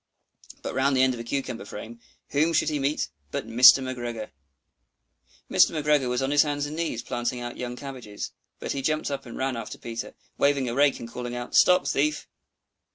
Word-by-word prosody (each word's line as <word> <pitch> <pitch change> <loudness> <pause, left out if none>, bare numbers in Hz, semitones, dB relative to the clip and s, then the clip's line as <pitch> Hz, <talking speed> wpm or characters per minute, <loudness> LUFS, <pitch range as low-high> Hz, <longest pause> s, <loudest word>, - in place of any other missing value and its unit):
But - - -4
round 135 0 +2
the 130 - +5
end 130 0 +3
of 120 - -7
a - - -5
cucumber 125 -1 -3
frame, 110 +3 -9 0.3
whom 155 +4 +2
should 160 - +2
he 150 -1 -1
meet 140 +2 0 0.2
but - - -4
Mr. 125 +3 +8
McGregor! 120 -4 -5 1.2
Mr. 160 - +4
McGregor 150 -4 +2
was 125 +2 0
on 135 - 0
his 145 0 +6
hands 145 -1 0
and 150 +1 -6
knees 160 -8 -2
planting 120 +1 -2
out 120 0 -6
young 125 0 -5
cabbages, 125 -6 -7 0.3
but - - -4
he 140 - -2
jumped 155 +1 -1
up 140 -2 -4
and 120 - -8
ran 130 -1 -1
after 115 -1 -6
Peter, 115 0 -6 0.2
waving 140 -2 +2
a 120 - -2
rake 140 +1 +3
and 115 - -7
calling 120 +1 -6
out, 120 0 -6
"Stop 180 -6 +5
thief!" 150 +2 0
130 Hz, 200 wpm, -26 LUFS, 120-145 Hz, 1.2 s, Mr